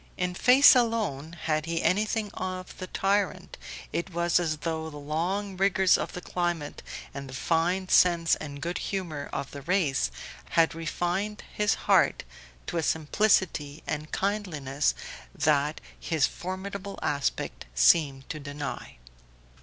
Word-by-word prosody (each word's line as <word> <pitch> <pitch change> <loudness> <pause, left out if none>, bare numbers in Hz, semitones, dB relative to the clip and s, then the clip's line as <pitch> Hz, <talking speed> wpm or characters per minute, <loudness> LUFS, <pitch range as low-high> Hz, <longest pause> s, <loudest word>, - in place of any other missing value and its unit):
In 180 0 -1
face 255 +9 +7
alone 215 - 0
had 155 0 0
he 165 0 -1
anything 210 +2 +1
of 185 0 -5
the 185 - -5
tyrant; 200 - 0 0.4
it 170 - -2
was 170 +1 +2
as 160 -3 -1
though 160 0 -3
the 150 - -9
long 175 +7 -2
rigours 190 -1 +4
of - - -3
the 180 - -6
climate 175 -5 -2 0.3
and 140 -1 -7
the 130 - -7
fine 175 +6 +1
sense 170 -3 +4
and 140 -2 -7
good 175 +1 -2
humour 170 -7 -4
of 140 - -4
the 140 - -8
race 150 - +1 0.5
had 165 -1 +5
refined 175 +6 -2
his 210 0 +2
heart - - +4 0.4
to - - -3
a - - +2
simplicity 160 -2 +1
and 150 0 -4
kindliness 155 -9 -1 0.4
that 150 0 +2 0.2
his 160 -4 +1
formidable 195 +2 -5
aspect 140 -2 -2
seemed 135 - +4
to 155 - -5
deny. 145 - -6
170 Hz, 140 wpm, -28 LUFS, 150-190 Hz, 0.5 s, face